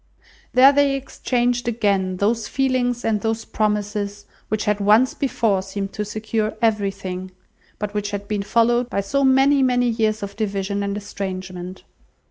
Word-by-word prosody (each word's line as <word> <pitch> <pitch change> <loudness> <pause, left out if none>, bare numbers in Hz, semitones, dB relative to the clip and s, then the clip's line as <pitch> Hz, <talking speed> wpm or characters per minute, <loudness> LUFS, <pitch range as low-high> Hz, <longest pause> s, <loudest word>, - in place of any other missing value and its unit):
There 260 +2 +8
they 285 -1 +3
exchanged 245 -2 -1
again 200 -5 0
those 215 +3 0
feelings 255 -3 0
and 215 -2 +1
those 225 0 -2
promises 210 -1 -2 0.2
which 215 0 -2
had 210 -1 +1
once 215 +5 +4
before 225 -8 0
seemed 195 +1 -5
to 210 - -2
secure 215 +1 -2
everything, 195 -4 -1 0.5
but 210 -1 -4
which 205 -1 -2
had 205 0 -5
been 210 -1 -1
followed 240 +3 +2
by 200 - -1
so 275 +8 0
many, 270 +1 +4
many 245 -1 +2
years 220 -2 0
of 200 0 -6
division 200 -2 -2
and 200 0 -2
estrangement. 185 -2 -6
210 Hz, 150 wpm, -22 LUFS, 200-240 Hz, 0.5 s, There